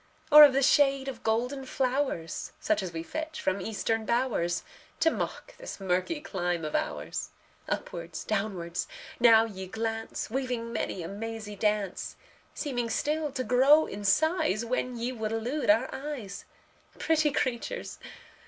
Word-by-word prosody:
Or 300 +1 +12
of 285 -3 +8
the 275 +1 +2
shade 275 -1 +4
of 255 -4 -5
golden 245 +5 0
flowers, 260 - -2
Such 215 -1 +1
as 185 -2 -4
we 165 0 -5
fetch 315 - -5
from 190 +1 -1
Eastern 220 +2 -1
bowers, 230 -8 0 0.4
To 325 - +5
mock - - -5
this - - -8
murky 190 - 0
clime 175 - -2
of 155 - -4
ours? - - -2 0.4
Upwards, 170 -1 -4
downwards, 195 -5 -2 0.3
now 230 -2 +7
ye 190 -4 -7
glance, 225 +2 -3
Weaving 245 -3 -2
many 180 - -2
a - - -5
mazy 215 +1 -6
dance; 210 -2 -1 0.4
Seeming 245 -6 -2
still 300 +5 -1
to 260 -1 -2
grow 275 +6 +5
in 205 - -7
size 235 - +2
When 250 0 -2
ye 235 +2 -2
would 220 -3 -3
elude 240 +4 -2
our 225 +5 +5
eyes 265 -9 -6 0.5
Pretty 310 -2 +2
creatures! 270 - -3
230 Hz, 145 wpm, -29 LUFS, 200-270 Hz, 0.5 s, Or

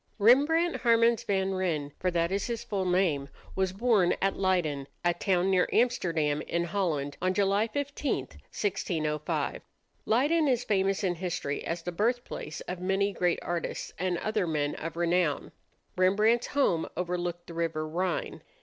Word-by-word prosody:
Rembrandt 290 +10 +4
Harmens 230 -1 +3
van 195 -1 0
Rijn 165 -7 -1
for 185 - +1
that 170 0 0
is 200 +1 -1
his 235 -2 -3
full 195 -3 -2
name 175 -7 +1 0.3
was 190 -1 +1
born 200 -3 +3
at 195 0 +1
Leyden, 165 -8 0 0.2
a 175 - +4
town 185 +1 +1
near 185 -1 +3
Amsterdam, 165 -12 +1
in 170 +1 -1
Holland, 160 -6 -1
on 185 +1 +1
July 200 +2 +2
15, 285 +4 -2
1605. 155 -7 -3 0.5
Leyden 295 +7 +3
is 250 -3 +2
famous 195 -1 +1
in 185 -2 +1
history 170 -5 -3
as 165 0 -3
the 175 - -3
birthplace 215 -5 -2
of 180 0 -5
many 195 +2 0
great 175 -2 +1
artists 175 -1 -3
and 180 -1 0
other 215 -1 -1
men 150 -2 0
of 165 +1 -6
renown. 170 -3 +1 0.4
Rembrandt's 210 +6 +3
home 220 - +1
overlooked 175 -1 -3
the 170 - -10
river 165 -2 -2
Rhine. 180 +3 -2
185 Hz, 150 wpm, -29 LUFS, 170-210 Hz, 0.5 s, Rembrandt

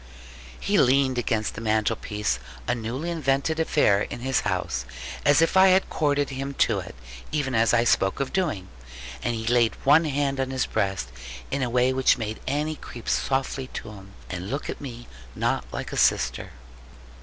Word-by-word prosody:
He 200 +1 +2
leaned 130 0 +3
against 110 -2 -1
the 110 - -7
mantelpiece 105 - 0 0.3
(a 120 - +2
newly 125 +8 -3
invented 155 0 0
affair 145 -11 +3
in 120 - -5
his 130 0 +1
house) - - -2 0.4
as 145 +2 +5
if 165 - +1
I 190 0 +7
had 190 0 +3
corded 145 -2 +1
him 135 +1 -4
to - - +2
it, - - -8 0.4
even 140 -4 -1
as 115 0 +3
I 120 -1 +4
spoke 95 -4 +2
of 135 -1 -2
doing. 155 - -1 0.5
And 120 - -1
he 110 0 -4
laid 120 -1 +3
one 150 +4 +6
hand 140 -2 0
on 130 -1 0
his 130 -1 0
breast 95 0 -1 0.4
in 140 - -1
a 125 - 0
way 125 +2 +2
which 130 0 +3
made 110 -2 -4
Annie 150 +3 -1
creep 120 - -10
softly 135 0 0
to - - -6
him, 100 -1 -13
and 90 +1 -5
look 140 +4 -3
at - - -9
me 120 -4 -8 0.3
not - - 0
like - - -5
a - - -3
sister. - - +2
130 Hz, 180 wpm, -25 LUFS, 115-145 Hz, 0.5 s, I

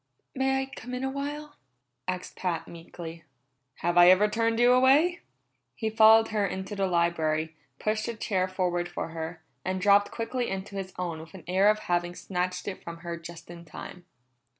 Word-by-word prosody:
"May 265 0 +1
I - - -4
come 250 -2 -8
in 250 - -4
a 265 - -1
while?" 290 +2 -5 0.5
asked 185 0 -4
Pat 175 -3 -2
meekly. 165 -1 -9 0.6
"Have 175 +1 +3
I 175 0 +9
ever 190 +3 +6
turned 230 +1 0
you 245 +1 +6
away?" 285 +8 +4 0.6
He 220 -1 -2
followed 220 0 +7
her 215 -2 0
into 190 +1 -3
the 195 -1 +1
library, 160 -3 0 0.2
pushed 215 +4 -1
a 235 - -3
chair 190 -4 0
forward 180 -2 -1
for 175 - -4
her, 160 0 -6 0.2
and 185 0 -2
dropped 205 +1 +5
quickly 240 +2 -3
into 195 +1 -5
his 190 -1 -4
own 175 -3 -3
with 160 +3 -12
an 180 - -10
air 190 +3 +4
of 215 - +3
having 175 -1 -1
snatched 180 -1 -3
it 195 - -5
from 170 0 -7
her 170 0 -3
just 170 0 -10
in 170 -1 -10
time. 175 +2 -10
185 Hz, 185 wpm, -28 LUFS, 175-225 Hz, 0.6 s, I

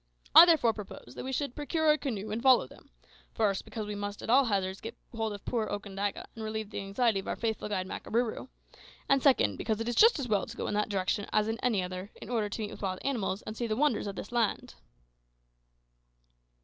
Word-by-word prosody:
I 345 - +11
therefore 300 -9 +4
propose 200 - -10
that - - -6
we 265 - -4
should 275 -1 -2
procure 310 +1 +2
a - - +4
canoe 215 -6 -4
and 220 +2 -2
follow 260 - +6
them: - - -17 0.5
first, 200 -3 +1
because 220 -2 -5
we 210 - -4
must 205 0 -5
at - - -1
all 270 +2 +6
hazards 195 -3 -1
get 230 +2 -7 0.2
hold 225 -1 -1
of 205 -1 -8
poor 225 -3 -1
Okandaga, 205 -1 -3
and 225 - -7
relieve 220 -1 -4
the - - -4
anxiety 200 +2 +1
of 195 - -8
our - - -1
faithful 220 -2 -2
guide 190 -3 -1
Makarooroo; 230 +5 -2 0.6
and 275 -1 +3
second, 275 -2 +3
because 220 -1 -1
it 225 - -3
is 240 - 0
just 455 - +6
as 275 -4 -3
well 210 -3 +1
to - - -10
go - - -3
in - - -2
that 210 +1 0
direction 200 +1 -1
as 215 0 +2
in 225 +1 -2
any 220 -7 +1
other, 185 +2 -6
in - - -9
order 220 -4 0
to 220 - -5
meet 210 - -5
with - - -10
wild 190 -2 -2
animals, 220 -7 -1
and 215 - -6
see 235 +1 -2
the 215 - -1
wonders 255 -5 +1
of 200 - -5
this 200 - -7
land." 235 -3 0
220 Hz, 230 wpm, -30 LUFS, 205-245 Hz, 0.6 s, I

